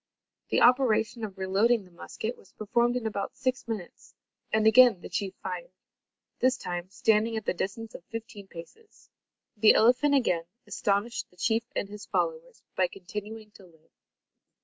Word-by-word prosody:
The - - +2
operation 235 -2 +3
of 200 -3 -6
reloading 200 +4 +2
the 180 - -19
musket 220 +7 -6
was - - -21
performed 235 +3 +1
in 245 -2 -2
about 205 -2 -3
six 255 -2 -2
minutes 210 -7 -7 0.4
and 220 0 +2
again 230 -2 +7
the - - -9
chief 195 -2 -3
fired. 180 -2 -5 0.7
This 255 0 +3
time, 175 -2 -5
standing 220 +2 +2
at 220 - -5
the - - +1
distance 215 +5 -4
of - - -10
fifteen 220 -3 -8
paces. 190 - -14 0.5
The 215 +1 +6
elephant 255 +5 +4
again 180 -11 +1 0.2
astonished 205 +3 -1
the 180 - -27
chief 225 +5 +1
and - - -1
his 205 0 -10
followers, - - -2
by 185 - +2
continuing 210 +4 -8
to 205 - -17
live. 160 -2 -25
215 Hz, 160 wpm, -28 LUFS, 190-235 Hz, 0.7 s, again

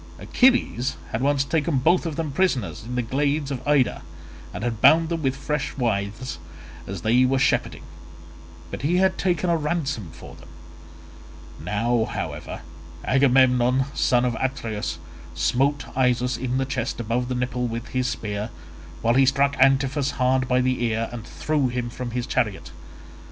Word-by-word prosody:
Achilles 245 - +2
had 110 - -2
once 140 0 +2
taken 155 0 0
both 170 +6 +2
of 160 - -4
them 160 -2 -3
prisoners 135 - 0
in 120 +3 -6
the 125 - 0
glades 140 +4 -1
of 130 -3 -3
Ida, 145 -4 +2 0.5
and 90 - -6
had 115 -2 -3
bound 160 0 +6
them 165 -1 -2
with 135 -2 0
fresh 150 +1 -3
withes 110 0 -2 0.5
as 95 -3 -6
they 120 +3 +4
were 130 +1 +2
shepherding, 130 - 0 0.9
but - - -5
he 165 +6 +1
had 190 0 +2
taken 180 -2 0
a - - +3
ransom 150 - -2
for 85 - -12
them; - - -15 1.1
now, 110 +7 0
however, - - -5 0.4
Agamemnon 130 -1 +4
son 125 0 +2
of 120 -2 0
Atreus 110 -9 -3 0.4
smote 140 +3 +1
Isus 125 -1 +1
in 125 +1 -2
the 135 - 0
chest 130 -2 -3
above 120 +2 -1
the 125 - -2
nipple 125 0 -1
with 115 +1 -5
his 130 0 -1
spear, 105 -2 -3 0.5
while 115 +1 +3
he 135 +1 +4
struck 140 +1 +2
Antiphus 135 +1 +3
hard 130 0 +2
by 125 0 +2
the 130 -1 0
ear 115 -1 -1
and 120 -2 -8
threw 150 -3 0
him 120 -1 -3
from 125 0 -5
his 120 0 -3
chariot. - - -2
130 Hz, 160 wpm, -24 LUFS, 120-140 Hz, 1.1 s, bound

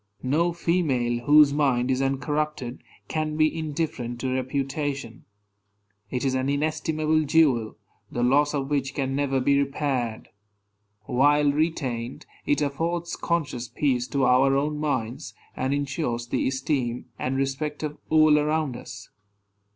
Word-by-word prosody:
No 155 +7 +2
female, 135 -9 0
whose 150 -1 +7
mind 135 -4 +2
is 130 0 +1
uncorrupted, 135 -1 -2 0.3
can 155 -1 -2
be 155 +1 +3
indifferent 150 -6 -3
to 130 -1 -1
reputation. 135 -1 -3 0.8
It 125 +1 -2
is 130 - +1
an 130 +1 0
inestimable 155 +1 0
jewel, 135 -8 +2 0.3
the 120 - -2
loss 145 +4 +3
of 140 0 -3
which 135 -2 -1
can 135 -1 -1
never 135 -1 +1
be 140 +2 +3
repaired. 135 -5 -2 0.7
While 145 +5 +3
retained, 135 -6 -2 0.2
it 145 +1 +2
affords 165 +4 -2
conscious 145 -8 -2
peace 125 -2 0
to 140 -1 0
our 130 +2 +4
own 150 +2 0
minds, 130 -6 -3 0.2
and 130 +1 -1
insures 140 -4 -2
the - - 0
esteem 130 -2 -1
and 130 +1 -1
respect 140 +3 -2
of 150 -1 -4
all 155 -1 +5
around 150 -3 0
us. - - -10
140 Hz, 135 wpm, -25 LUFS, 130-150 Hz, 0.8 s, whose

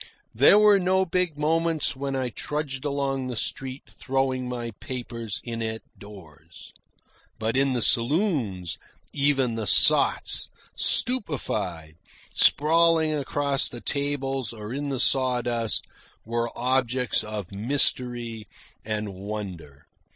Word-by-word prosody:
There 140 - +6
were 210 -1 +6
no 190 +1 +2
big 180 -3 -1
moments 160 0 +1
when 135 0 -3
I 130 -2 -1
trudged 145 +2 -4
along 140 -2 -1
the 125 - -4
street 130 +4 -4
throwing 130 -1 -2
my 120 -1 -4
papers 115 -4 -5
in 115 -1 -5
at 110 -1 -3
doors. 85 -6 -14 0.6
But 110 +1 -2
in 135 0 +2
the 120 -3 0
saloons, 120 - 0 0.3
even 140 -4 +2
the 110 -2 -3
sots, - - +4 0.3
stupefied, 105 - -1 0.4
sprawling 160 +1 +4
across 140 -1 0
the 120 - -8
tables 135 -3 -2
or 105 +1 -7
in 145 +1 -3
the 135 -2 -2
sawdust, 120 -4 +1 0.4
were 115 +1 -1
objects 125 -1 +1
of 105 -3 -6
mystery 120 0 0 0.4
and 105 -2 -3
wonder. 95 -8 -7
130 Hz, 115 wpm, -25 LUFS, 110-145 Hz, 0.6 s, There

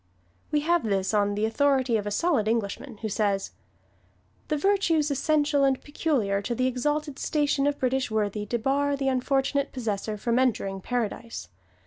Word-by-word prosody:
We 295 - +1
have 340 +2 +2
this 195 -2 0
on 205 -1 +2
the 210 +1 +1
authority 260 +1 +2
of 210 -2 -1
a - - 0
solid 255 -1 +1
Englishman, 225 +2 -2
who - - 0
says: 200 -2 0 1.0
"The 305 - 0
virtues 330 -4 +2
essential 290 0 +2
and 270 -1 +3
peculiar 260 -10 0
to 235 +4 -3
the 255 - +1
exalted 290 +3 -1
station 290 -2 +1
of 290 0 0
British 260 0 0
Worthy 210 -1 -1
debar 275 +5 +1
the 275 -1 0
unfortunate 270 +2 0
possessor 215 -3 -3
from 235 +3 +1
entering 195 -6 0
Paradise. 230 - -3
255 Hz, 155 wpm, -26 LUFS, 215-285 Hz, 1.0 s, and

